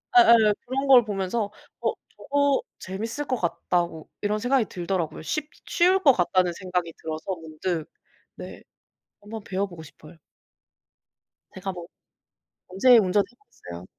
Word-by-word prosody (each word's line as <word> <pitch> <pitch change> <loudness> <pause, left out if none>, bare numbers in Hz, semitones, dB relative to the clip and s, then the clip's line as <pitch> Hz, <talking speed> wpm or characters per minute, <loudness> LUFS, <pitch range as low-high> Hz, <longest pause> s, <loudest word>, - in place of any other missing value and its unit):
예예. 235 - +7
그런 270 +2 -2
걸 255 -3 +8
보면서 205 0 -2 0.3
'어 - - +1 0.2
저거 285 -1 +1 0.2
재밌을 225 +9 -5
것 260 - 0
같다.'고 170 -2 -2
이런 210 +1 0
생각이 245 +1 +2
들더라구요. 175 -4 -3
쉽 300 - -3 0.2
쉬울 370 +2 +3
것 280 -7 +6
같다는 180 -2 +2
생각이 180 -1 -3
들어서 160 +4 -4
문득 160 0 -4 0.5
네 - - -9 0.6
한번 215 +1 -8
배워 195 +1 -1
보고 175 -4 -11
싶어요. 155 +2 -15 1.4
제가 190 +1 -4
뭐 175 -2 -9 0.8
언제 235 +7 +6
운전 205 -1 +3
해 240 - -24
보겠어요. 90 - -11
195 Hz, 280 characters per minute, -25 LUFS, 175-240 Hz, 1.4 s, 걸